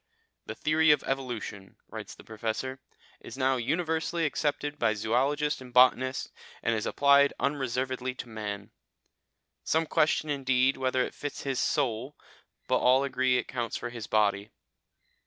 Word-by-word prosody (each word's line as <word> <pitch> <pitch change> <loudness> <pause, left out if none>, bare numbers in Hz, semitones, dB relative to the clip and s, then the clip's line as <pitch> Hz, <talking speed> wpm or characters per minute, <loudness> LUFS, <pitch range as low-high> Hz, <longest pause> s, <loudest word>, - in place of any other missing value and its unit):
"The - - -5
theory 155 +1 +2
of 150 -2 +5
evolution," 120 -7 -4
writes - - -8
the - - -15
Professor, 115 +4 -4 0.4
"is - - -10
now 130 -1 +2
universally 160 +5 -1
accepted 145 0 -2
by 110 -2 +2
zoologists 135 +8 0
and 125 -1 -11
botanists, 130 +1 +3 0.3
and 115 - +2
it - - 0
is - - -4
applied 140 0 +4
unreservedly 130 -2 -1
to 130 - -7
man. 105 -3 -6 0.9
Some 160 +1 +1
question, 155 0 +1
indeed, 130 -1 +2
whether 130 -1 +1
it - - -5
fits 145 -1 -6
his 135 -2 -1
soul, 130 -1 -1 0.5
but - - +2
all 130 +2 +4
agree 130 -2 +1
it - - +2
accounts 120 -3 -4
for 120 - -5
his 115 -2 -7
body. 105 -1 +1
130 Hz, 150 wpm, -28 LUFS, 120-145 Hz, 0.9 s, of